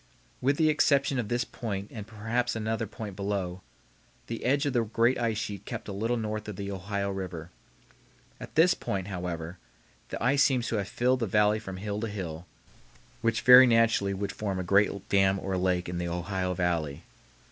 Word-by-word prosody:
With 140 +3 +2
the 155 -1 +4
exception 140 -3 +2
of 115 - -2
this 120 +3 0
point 100 -4 -5
and 105 -2 -7
perhaps 115 +3 -2
another 110 0 -2
point 105 -4 -7
below, 95 -2 -3 0.6
the 115 - -6
edge 140 +4 +2
of 140 - 0
the 120 -2 +2
great 115 +3 +2
ice 115 -3 0
sheet 105 -3 -4
kept 115 -1 -6
a - - -4
little 115 +5 -1
north 110 -1 -3
of 105 - -5
the 100 +1 -5
Ohio 100 +1 -3
River. 90 -3 -6 0.9
At - - -10
this 170 +3 +6
point, 95 0 -4
however, 90 -2 -5 0.5
the - - -4
ice 135 +3 +3
seems 125 -4 +2
to 115 - 0
have 100 -2 -2
filled 125 +3 +1
the 115 - -1
valley 105 +2 +3
from 95 -3 -7
hill 105 +1 -3
to 115 - -1
hill, 90 -5 -6 0.7
which 115 0 +1
very 125 +1 +9
naturally 115 -4 +3
would 100 0 -3
form 100 -2 -3
a 95 - -2
great 100 +1 +2
dam 95 -1 +3
or 95 0 -3
lake 90 -1 0
in 90 0 -3
the 85 - -2
Ohio 90 +1 -2
Valley. 85 -5 -1
105 Hz, 190 wpm, -28 LUFS, 95-115 Hz, 0.9 s, very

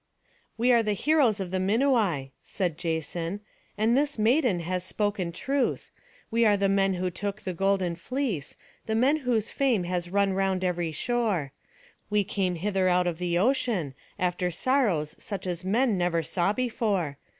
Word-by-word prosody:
"We 245 +2 +3
are 235 -1 +5
the 215 -2 0
heroes 260 -2 +2
of 185 -2 -4
the 185 - 0
Minuai," 200 - +1
said 180 -5 -2
Jason; 165 +3 -3 0.4
"and 220 +3 +3
this 285 0 +1
maiden 225 - +2
has 180 +2 -2
spoken 200 -2 -2
truth. 270 +9 -1 0.4
We 230 +1 +3
are 210 -2 +4
the 200 0 +2
men 195 -1 +2
who 180 0 -2
took 200 +3 -4
the 185 -3 -4
golden 190 -1 +1
fleece, 225 - -3 0.3
the 220 - 0
men 265 +7 +3
whose 240 -6 0
fame 250 -9 +1
has 175 0 -2
run 200 0 +2
round 190 -1 0
every 175 -2 -1
shore. 195 - -1 0.6
We 210 0 +2
came 190 -2 -1
hither 190 +1 0
out 180 0 +3
of 175 -2 -2
the 175 -1 0
ocean, 210 - +1 0.2
after 180 -1 0
sorrows 180 - +1
such 200 -3 -5
as 175 -1 -3
man 215 +1 +1
never 170 -2 +1
saw 175 +4 0
before. 205 - -1
195 Hz, 165 wpm, -27 LUFS, 175-225 Hz, 0.6 s, are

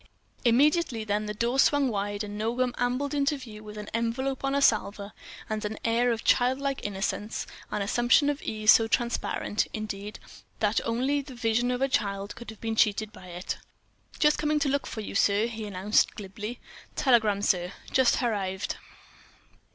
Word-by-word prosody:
Immediately 260 0 +3
then 210 0 -1
the 210 - -3
door 240 +5 0
swung 285 0 +4
wide, 205 -1 -2
and 205 0 -6
Nogam 240 +4 0
ambled 255 +4 0
into 285 0 +1
view 220 -5 -10
with 210 0 -9
an 210 0 -6
envelope 245 +4 -1
on 275 0 0
a - - +3
salver 210 -5 +1 0.3
and 215 0 -3
an 215 +1 -3
air 235 +1 +3
of 225 -1 -2
childlike 265 +2 +2
innocence, 205 +1 -3 0.2
an 210 - -1
assumption 240 +7 +3
of 290 -1 -1
ease 215 0 +4
so 225 - +5
transparent, 230 -2 0
indeed, 210 -1 -5 0.4
that 210 0 +2
only 260 +5 +1
the 270 -2 -11
vision 240 +1 +1
of 250 +1 0
a - - +3
child 200 -5 -1
could 235 - -9
have 220 - -10
been 225 -1 -2
cheated 215 -1 +2
by 185 - -12
it. 180 +1 -5 0.6
"Just 300 -1 +3
coming 300 0 +1
to 290 -1 +1
look 280 +1 0
for 220 - -5
you, 210 - -6
sir," 200 +2 +3
he 225 -2 -5
announced, 200 +2 +2
glibly. 210 +3 -6 0.4
"Telegram, 220 -7 +3
sir—just 190 +7 +1
harrived." 200 -6 -2
225 Hz, 170 wpm, -27 LUFS, 210-255 Hz, 0.6 s, so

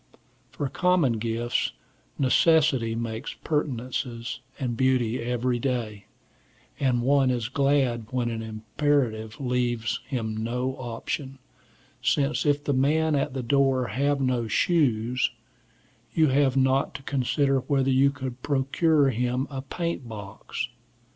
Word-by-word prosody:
For 145 - -3
common 160 -7 +2
gifts, 115 +2 -1 0.4
necessity 135 -4 +3
makes 115 +2 -4
pertinences 125 -5 -2 0.2
and 125 -4 -2
beauty 125 -2 +1
every 120 +1 0
day, 115 -6 -3 0.7
and 125 -3 +1
one 135 0 +4
is 120 -2 -1
glad 135 -5 +1
when 120 -1 -1
an 115 -1 -3
imperative 110 0 -1
leaves 125 -3 -1
him 110 -5 -2
no 125 +4 -2
option, 130 +3 -4 0.6
since 145 +1 +1
if 145 0 +2
the 145 - 0
man 155 +4 +2
at 135 -2 0
the 130 - -2
door 135 0 +2
have 140 +1 +1
no 125 -3 0
shoes, 125 -2 +2 0.9
you 160 -3 +4
have 135 0 +3
not 130 +1 +2
to - - -7
consider 135 +1 +1
whether 135 0 +1
you 135 +1 +5
could 130 -3 -6
procure 140 +1 +2
him 125 +2 0
a 135 -1 -4
paint 155 -2 -4
box. 105 -2 -6
130 Hz, 125 wpm, -26 LUFS, 120-140 Hz, 0.9 s, you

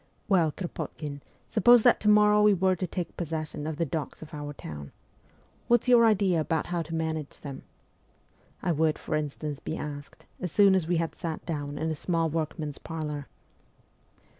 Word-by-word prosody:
' - - -39
Well, 175 -6 +3
Kropotkin, 150 -4 -6 0.3
suppose 240 - +6
that - - +5
to 210 - +2
morrow 210 0 +6
we 210 -1 +6
were 185 +1 +2
to 185 +1 -3
take 175 0 -4
possession 155 -2 -4
of 160 -2 -4
the 170 - +1
docks 155 +1 -4
of 160 - -13
our 145 -1 -5
town. 75 - -8 0.8
What's 240 +1 +3
your 240 -2 +7
idea 195 -6 +3
about 160 0 -1
how 175 -1 -2
to 165 0 -5
manage 160 -2 -3
them? 140 -2 -7 0.5
' - - -35
I 175 - +1
would, 155 -1 +2
for - - -5
instance, 150 -1 -3
be 160 - -4
asked 145 -1 -7
as 180 - -4
soon 200 +1 +6
as 185 -4 +1
we 175 0 +2
had 165 0 -1
sat 165 -3 -5
down 145 -3 -4
in 160 0 -1
a - - -2
small 165 +1 0
workman's 155 -2 -3
parlour. 150 -3 -5
160 Hz, 190 wpm, -28 LUFS, 150-185 Hz, 0.8 s, your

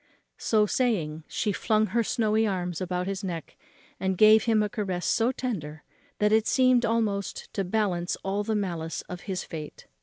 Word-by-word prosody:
So 215 -2 +3
saying, 170 -11 -1
she 210 - -1
flung 215 +2 +1
her 235 0 +3
snowy 220 0 +1
arms 180 -3 -2
about 180 0 -2
his 195 +1 -4
neck, 170 -4 -5 0.4
and 190 -1 -1
gave 215 +1 +7
him 220 -2 +3
a - - 0
caress 195 -5 -3
so 230 +2 +2
tender, 160 - -5 0.3
that 210 0 +2
it 220 0 +3
seemed 255 -2 +4
almost 215 -3 -1
to 195 - -1
balance 185 -3 0
all 195 +2 -1
the 220 +1 -1
malice 170 -5 -3
of 180 0 -8
his 185 -1 -2
fate. 155 -3 -8
200 Hz, 175 wpm, -27 LUFS, 180-220 Hz, 0.4 s, gave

